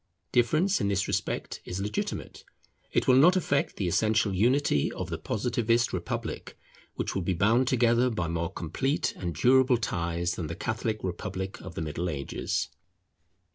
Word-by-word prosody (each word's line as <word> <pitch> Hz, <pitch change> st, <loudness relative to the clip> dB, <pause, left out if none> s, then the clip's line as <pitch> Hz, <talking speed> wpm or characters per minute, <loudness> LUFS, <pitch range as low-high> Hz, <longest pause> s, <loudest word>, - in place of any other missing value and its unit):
Difference 155 Hz, +11 st, +2 dB
in -, -, +1 dB
this 100 Hz, -1 st, 0 dB
respect -, -, -2 dB
is 90 Hz, -, -5 dB
legitimate: 105 Hz, +1 st, -4 dB, 0.5 s
it -, -, +1 dB
will 130 Hz, -, +6 dB
not 170 Hz, +7 st, +7 dB
affect 145 Hz, -6 st, 0 dB
the 95 Hz, -, -2 dB
essential 110 Hz, +3 st, +2 dB
unity 120 Hz, -, +2 dB
of -, -, -5 dB
the -, -, -2 dB
Positivist 120 Hz, +1 st, 0 dB
Republic, 90 Hz, -2 st, -4 dB, 0.4 s
which -, -, -2 dB
will 95 Hz, -, -1 dB
be 90 Hz, +1 st, -1 dB
bound 115 Hz, +8 st, +3 dB
together 120 Hz, 0 st, +3 dB
by 90 Hz, -8 st, -2 dB
more 85 Hz, 0 st, -2 dB
complete 135 Hz, -, -1 dB
and 85 Hz, -3 st, -4 dB
durable 130 Hz, -, +4 dB
ties 85 Hz, -5 st, -1 dB
than 85 Hz, -, -4 dB
the 85 Hz, -, -5 dB
Catholic 110 Hz, +1 st, -2 dB
Republic 95 Hz, +1 st, -4 dB
of -, -, -9 dB
the -, -, -3 dB
Middle 80 Hz, +3 st, -3 dB
Ages. 70 Hz, -4 st, -2 dB
105 Hz, 160 wpm, -28 LUFS, 85-125 Hz, 0.5 s, not